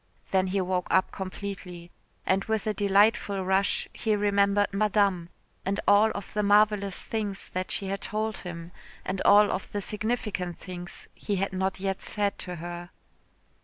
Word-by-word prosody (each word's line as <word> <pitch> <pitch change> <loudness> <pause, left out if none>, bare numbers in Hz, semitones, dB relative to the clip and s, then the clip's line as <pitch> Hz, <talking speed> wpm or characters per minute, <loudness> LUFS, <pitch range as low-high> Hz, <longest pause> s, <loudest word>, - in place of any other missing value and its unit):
Then 190 -1 +3
he 195 +2 0
woke 180 -1 -1
up 185 - +3
completely, 185 -2 -7 0.3
and 195 +1 +2
with 220 -1 -1
a 215 - 0
delightful 200 -1 +3
rush 190 +1 +1
he 220 -2 0
remembered 200 0 +2
Madame 200 -4 +2 0.3
and 200 +1 -1
all 205 +2 +6
of 200 - -6
the 210 - +1
marvellous 205 -1 +3
things 210 -3 -3
that 185 0 -3
she 195 - -1
had 195 +1 -3
told 215 0 -2
him 170 -1 -8 0.3
and 190 0 -2
all 205 0 +7
of 185 - -4
the 205 - -2
significant 210 -4 -3
things 175 -2 -8
he 205 - -3
had 195 0 -1
not 190 0 -1
yet 195 0 -2
said 205 -1 -1
to 180 -1 -5
her. 175 +1 -7
195 Hz, 165 wpm, -27 LUFS, 185-205 Hz, 0.3 s, all